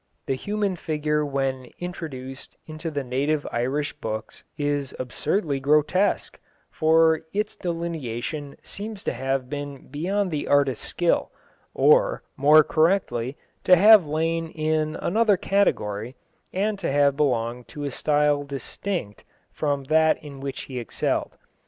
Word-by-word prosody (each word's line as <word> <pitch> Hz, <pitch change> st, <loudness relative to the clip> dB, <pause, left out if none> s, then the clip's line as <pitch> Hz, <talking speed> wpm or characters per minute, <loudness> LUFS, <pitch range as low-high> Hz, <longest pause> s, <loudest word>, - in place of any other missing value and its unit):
The -, -, 0 dB
human 205 Hz, +6 st, -2 dB
figure 150 Hz, -1 st, -1 dB
when 135 Hz, -2 st, -2 dB
introduced 135 Hz, -7 st, -7 dB
into 155 Hz, +1 st, -5 dB
the 145 Hz, -3 st, -3 dB
native 140 Hz, +4 st, 0 dB
Irish 140 Hz, +5 st, -1 dB
books 110 Hz, -6 st, -6 dB
is 145 Hz, -2 st, -1 dB
absurdly 140 Hz, -, -1 dB
grotesque, 150 Hz, +8 st, +2 dB, 0.3 s
for 160 Hz, 0 st, +4 dB
its 210 Hz, +1 st, -1 dB
delineation 155 Hz, -5 st, -4 dB
seems 210 Hz, 0 st, -6 dB
to -, -, -1 dB
have 135 Hz, +1 st, -2 dB
been 145 Hz, 0 st, -6 dB
beyond 185 Hz, +7 st, -1 dB
the 150 Hz, -2 st, -2 dB
artist's 140 Hz, -4 st, +2 dB
skill, 175 Hz, -1 st, +1 dB, 0.4 s
or, -, -, +4 dB
more 150 Hz, +3 st, +7 dB
correctly, 155 Hz, -7 st, +1 dB, 0.3 s
to 185 Hz, -, +7 dB
have 210 Hz, +2 st, +8 dB
lain 165 Hz, +2 st, 0 dB
in 155 Hz, 0 st, -1 dB
another 215 Hz, +1 st, +2 dB
category, 120 Hz, -, 0 dB, 0.4 s
and 205 Hz, +2 st, -1 dB
to -, -, -1 dB
have 140 Hz, 0 st, +3 dB
belonged 125 Hz, -4 st, 0 dB
to 145 Hz, -, -7 dB
a 140 Hz, -, -2 dB
style 150 Hz, +1 st, +2 dB
distinct 140 Hz, -, -5 dB, 0.3 s
from 145 Hz, -2 st, -1 dB
that 160 Hz, +3 st, +3 dB
in 140 Hz, -2 st, -9 dB
which 135 Hz, 0 st, -5 dB
he 130 Hz, -2 st, -6 dB
excelled. 120 Hz, -, -2 dB
150 Hz, 130 wpm, -24 LUFS, 135-170 Hz, 0.4 s, have